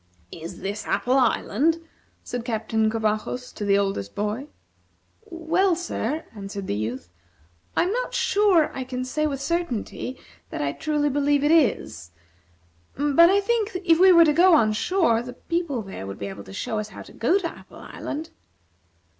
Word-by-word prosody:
"Is 170 +2 -8
this 205 +2 -4
Apple 255 +2 +2
Island?" 265 +5 +2 0.5
said 245 -1 -4
Captain 220 -2 0
Covajos 220 +3 -2
to - - -6
the 200 -1 +3
oldest 195 - -2
boy. 210 +7 -2 0.8
"Well, 340 +1 +1
sir," 320 -4 -3
answered 200 -1 -6
the - - -2
youth, 110 -1 -4 0.7
"I - - +5
am 360 - -1
not - - -2
sure 395 -6 +3
I 265 - -4
can 255 0 -4
say 305 +4 0
with 275 -3 -3
certainty 275 -5 -3 0.3
that - - -5
I 140 -1 0
truly 295 - 0
believe 285 +1 +2
that 295 +2 +3
it 320 -6 +5
is; 85 +1 -11 0.9
but, 295 +4 +5
I 400 +1 +4
think, 435 -3 0
if 330 -1 +4
we 375 +1 +8
were 335 -2 +8
to 300 - +3
go 350 +2 +6
on 215 -7 +3
shore, 280 - +2
the 250 +1 -8
people 315 -5 -3
there 190 - -8
would 100 0 -6
be 100 - -5
able 100 +1 -9
to 95 - -11
tell 215 - -3
us 215 0 -5
how 195 - -10
to - - -15
go 290 +12 +2
to 380 -4 -2
Apple - - -16
Island." 315 +3 -6
265 Hz, 180 wpm, -24 LUFS, 210-335 Hz, 0.9 s, we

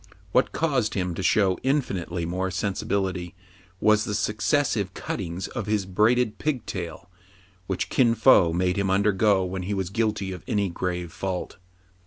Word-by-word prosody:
What 125 - +3
caused 135 -9 0
him 90 -3 -1
to 90 - -4
show 95 -1 +2
infinitely 95 - -1
more 95 +2 -2
sensibility 95 -1 -2 0.4
was 110 0 +4
the 105 - -2
successive 105 -2 0
cuttings 90 -1 -4
of 120 -5 -5
his 105 -2 0
braided 110 +4 +2
pigtail, 95 - -4 0.6
which 95 - -2
Kin 115 -3 +3
Fo 105 -7 +6
made 90 +3 0
him 100 -1 0
undergo 100 0 +3
when 95 +1 -4
he 100 +3 -2
was 95 -2 -3
guilty 105 -3 -1
of 90 -3 -7
any 100 -2 0
grave 90 -1 -3
fault. 95 0 -4
95 Hz, 150 wpm, -25 LUFS, 90-110 Hz, 0.6 s, Fo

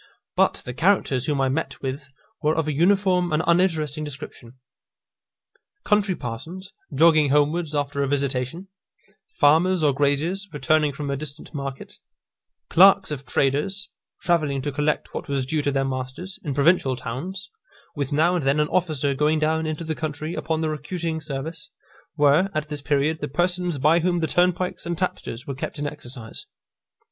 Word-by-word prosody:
But - - +2
the 125 - -5
characters 150 -6 +2
whom 145 -2 0
I 135 - +3
met 140 +5 -2
with 140 +1 -4 0.3
were 155 0 +2
of 160 -1 0
a 155 - 0
uniform 180 +2 +3
and 155 +1 +1
uninteresting 165 -4 +1
description. 140 -4 -9 1.3
Country 205 -3 +2
parsons, 165 +12 -7 0.2
jogging 155 0 +5
homewards 150 +2 +1
after 145 -1 -1
a 140 - +1
visitation; 140 +5 -2 0.7
farmers, 165 +4 +4
or 145 -2 +4
graziers, 145 +8 0
returning 150 0 +2
from 140 0 -4
a - - 0
distant 145 +2 -8
market; 140 -2 -6 0.7
clerks 195 0 +6
of 140 -3 -5
traders, 150 +11 0 0.3
travelling 150 -6 +1
to 145 - -2
collect 150 +2 -1
what - - -5
was 140 -2 -1
due 150 +3 0
to 145 - 0
their 135 0 0
masters, 130 +8 -5
in 145 -5 -3
provincial 140 -2 +3
towns; 180 +11 -6 0.4
with 140 -2 -3
now 160 +5 +3
and 175 -4 0
then 135 +2 +2
an 150 - +1
officer 155 -6 +1
going 150 +3 +2
down 160 +1 +1
into 155 +1 -3
the 160 -1 -2
country 155 +1 -4
upon 160 -1 -2
the 160 - 0
recruiting 160 +2 -3
service, 150 +2 -6 0.5
were, 150 +6 +4
at 155 0 -2
this 150 -2 -4
period, 145 +2 +1
the 150 - -2
persons 175 +2 0
by 155 +5 +4
whom 175 +1 +1
the 165 - +1
turnpikes 180 +3 +1
and 170 -1 -2
tapsters 130 -9 -3
were 140 - -4
kept 135 - -5
in 145 - -3
exercise. 120 -6 -6
150 Hz, 165 wpm, -24 LUFS, 140-170 Hz, 1.3 s, clerks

